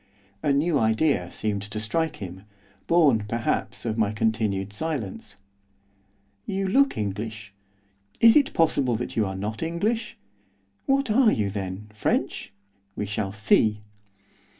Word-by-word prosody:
A 145 - +1
new 145 +2 +2
idea 110 - +2
seemed 105 0 -2
to 105 +1 -5
strike 160 +9 -1
him, 95 0 -9 0.4
born, 145 -11 +4
perhaps, 110 -2 -2
of 110 -1 -2
my 105 -2 +2
continued 110 -3 -1
silence. 135 -6 -4 1.1
'You 195 0 -1
look 275 +8 +3
English, 105 0 -4 0.7
is 230 0 +7
it 290 -3 +3
possible 140 -7 +2
that 120 +3 -4
you 110 -3 +1
are 95 - -4
not 105 +3 -4
English? 210 +7 -2 0.7
What 270 -3 +2
are 230 0 +5
you 100 -2 0
then 95 +1 -5
French? 105 - -1 0.4
We 105 - -2
shall 105 -1 -3
see! 105 0 +2
110 Hz, 130 wpm, -25 LUFS, 105-160 Hz, 1.1 s, is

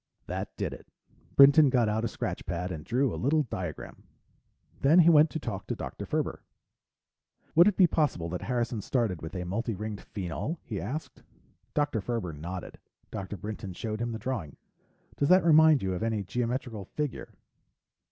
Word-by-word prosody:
That - - -4
did - - -2
it. - - -12 0.5
Brinton 140 +1 +8
got 125 -3 +3
out 110 +1 0
a - - +1
scratch - - -5
pad 90 +2 -3
and 80 -3 -6
drew 125 - +1
a - - -5
little 150 +4 +3
diagram. 90 - -6 0.8
Then 145 +5 +5
he 170 +1 +6
went 155 0 +6
to 160 - -4
talk - - -5
to - - -2
Dr. - - -6
Ferber. - - -2 1.1
"Would 170 +4 +7
it 210 - +2
be 185 - +7
possible 150 - 0
that 90 +1 -4
Harrison 120 -3 -1
started 110 -8 -1
with 80 +4 -7
a 90 -1 -3
multi 115 +5 -2
ringed 105 +1 -5
phenol?" 100 - -4
he 105 -5 -4
asked. 155 +4 -5 0.5
Dr. 145 -7 +1
Ferber 110 -6 -3
nodded. 85 +5 -7 0.3
Dr. 95 +1 -5
Brinton 105 0 -6
showed 110 +4 -4
him 120 0 -1
the 110 - -3
drawing. 110 - -4 0.6
"Does 140 - +1
that 185 -1 +6
remind 160 -4 +6
you 95 -1 0
of 90 - -4
any 110 -2 -1
geometrical 120 0 -3
figure?" 150 -4 -4
115 Hz, 175 wpm, -29 LUFS, 95-140 Hz, 1.1 s, Brinton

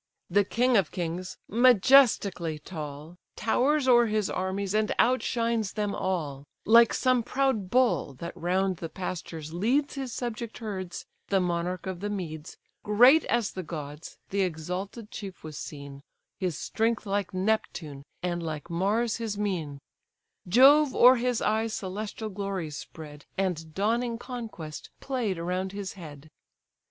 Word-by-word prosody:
The 205 +3 +4
king 245 +4 +2
of 190 -6 +2
kings, 175 +1 -4
majestically 225 - +4
tall, 150 0 -8 0.2
Towers 265 +5 +1
o'er 240 -2 +6
his 215 -2 0
armies, 190 +1 -2
and 215 0 +1
outshines 235 -4 +1
them 210 -2 -1
all; 150 -7 -2 0.2
Like 230 +1 +7
some 255 -2 +2
proud 245 -5 0
bull, 245 - +2
that 170 +6 -7
round 185 +1 0
the 165 - -6
pastures 165 -3 -6
leads 250 - +1
His 270 -3 -4
subject 235 -2 -5
herds, 190 -6 -5 0.2
the 195 - +2
monarch 180 0 -2
of 190 -2 -4
the 205 +2 -3
meads, 165 -6 -6 0.2
Great 245 +9 +6
as 235 -3 0
the 185 - -5
gods, 150 -2 -7
the 200 +1 +1
exalted 185 +6 -4
chief 195 -3 -8
was 155 -1 -8
seen, 140 -2 -8 0.4
His 180 -6 -1
strength 225 -1 -1
like 200 0 -1
Neptune, 185 -7 -2 0.2
and 175 -1 -1
like 155 -1 -5
Mars 210 +7 +1
his 225 -3 -3
mien; 175 -9 -2 0.7
Jove 270 +7 +6
o'er 250 +1 +7
his 245 0 0
eyes 220 +1 0
celestial 210 +3 -5
glories 190 -6 -4
spread, 150 -1 -10
And 165 -5 -2
dawning 230 +4 0
conquest 225 - -7
played 240 -9 -2
around 180 +3 -2
his 200 -2 -5
head. 155 -5 -11
195 Hz, 140 wpm, -28 LUFS, 170-230 Hz, 0.7 s, Like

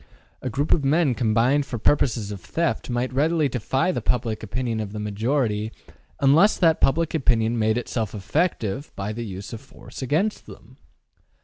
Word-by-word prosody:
A 130 - -3
group 140 +6 -1
of 150 - +3
men 145 0 +3
combined 120 +4 +2
for 120 - -4
purposes 115 -3 +1
of 100 -3 -7
theft 165 - -2
might 125 +1 -1
readily 155 +3 +2
defy 130 - 0
the - - -3
public 115 -3 -1
opinion 115 +1 -2
of 105 -2 -4
the 105 - -4
majority 110 +1 -1 0.5
unless 155 +10 +5
that 165 -3 +3
public 165 +4 +2
opinion 120 -6 +1
made 110 +1 +2
itself 115 -3 -3
effective 135 - -1
by 100 +2 -3
the 120 +2 -5
use 100 +2 -7
of 115 - -7
force - - -12
against 160 - 0
them. - - -14
125 Hz, 170 wpm, -24 LUFS, 110-145 Hz, 0.5 s, unless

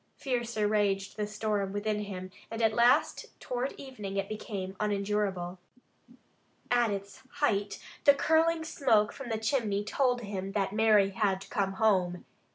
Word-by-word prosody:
Fiercer 235 -5 -1
raged 200 -2 0
the 210 -1 -2
storm 210 -2 -1
within 210 +1 -1
him 185 -2 -7 0.2
and 225 0 -3
at 220 -1 +4
last 245 +7 +3
toward 250 +2 -3
evening 210 -8 -7
it 195 0 -1
became 200 -3 -5
unendurable. 200 -3 -1 1.1
At 240 -2 +4
its 200 -1 -5
height 205 -8 0 0.3
the 285 - +8
curling 320 +2 +2
smoke 230 -9 +2
from 270 -3 -8
the 225 - -1
chimney 220 -3 0
told 245 +3 +1
him 195 -2 -5
that 195 -1 0
Mary 210 -2 +4
had 195 -1 0
come 195 -2 0
home. 185 -4 +1
210 Hz, 145 wpm, -30 LUFS, 195-235 Hz, 1.1 s, the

